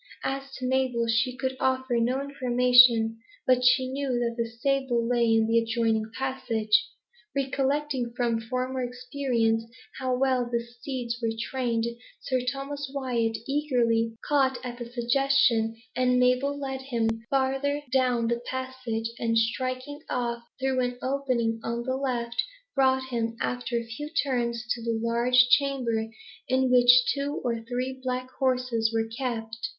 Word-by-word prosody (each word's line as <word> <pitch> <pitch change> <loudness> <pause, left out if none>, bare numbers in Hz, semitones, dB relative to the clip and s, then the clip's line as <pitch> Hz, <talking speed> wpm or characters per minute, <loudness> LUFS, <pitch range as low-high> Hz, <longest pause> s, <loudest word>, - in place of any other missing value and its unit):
As 275 0 -3
to 255 - -5
Mabel, 255 -2 +1
she 245 +3 +1
could 260 -1 -2
offer 260 -1 +1
no 250 +3 +1
information, 250 -4 +4 0.3
but 255 -1 +3
she 255 +1 +4
knew 275 +2 -3
that 235 -1 0
the 230 -1 -2
stable 240 0 0
lay 235 -1 +2
in 225 0 +4
an 225 +1 0
adjoining 225 -1 +1
passage. 230 -5 +1 0.5
Recollecting, 275 -1 -1
from 235 -2 +1
former 255 +2 -2
experience, 245 -2 -1 0.4
how 255 -1 0
well 255 -2 +1
the 235 - +1
steeds 235 0 -5
were 230 - 0
trained, 235 -2 -1 0.3
Sir 255 -1 -1
Thomas 275 0 -5
Wyat 240 -5 -1
eagerly 240 -6 +1
caught 270 -3 +2
at 240 0 -6
the 240 0 -7
suggestion, 240 -2 +2 0.2
and 250 0 +2
Mabel 250 +3 +2
led 265 -2 -4
him 240 -4 -1 0.2
farther 275 +2 0
down 250 -3 +2
the 235 0 -1
passage, 255 -3 -3
and 230 -1 +1
striking 255 +5 -1
off 235 -1 -2 0.2
through 265 0 0
an 245 -1 -1
opening 255 -4 0
on 235 +1 -2
the 260 +1 -1
left, 240 -3 -1 0.3
brought 265 -1 +2
him, 230 -2 -2
after 245 -1 -2
a 235 - -3
few 265 +7 -6
turns, 240 -3 -1
to 235 - -1
a 230 -1 -1
large 240 +2 +4
chamber, 255 -5 +2 0.4
in 260 0 +2
which 245 -1 +7 0.2
two 285 +1 -3
or 235 -2 -1
three 255 +1 -2
black 255 0 -3
horses 250 -4 +1
were 225 -1 0
kept. 225 -2 -4
250 Hz, 145 wpm, -27 LUFS, 235-265 Hz, 0.5 s, which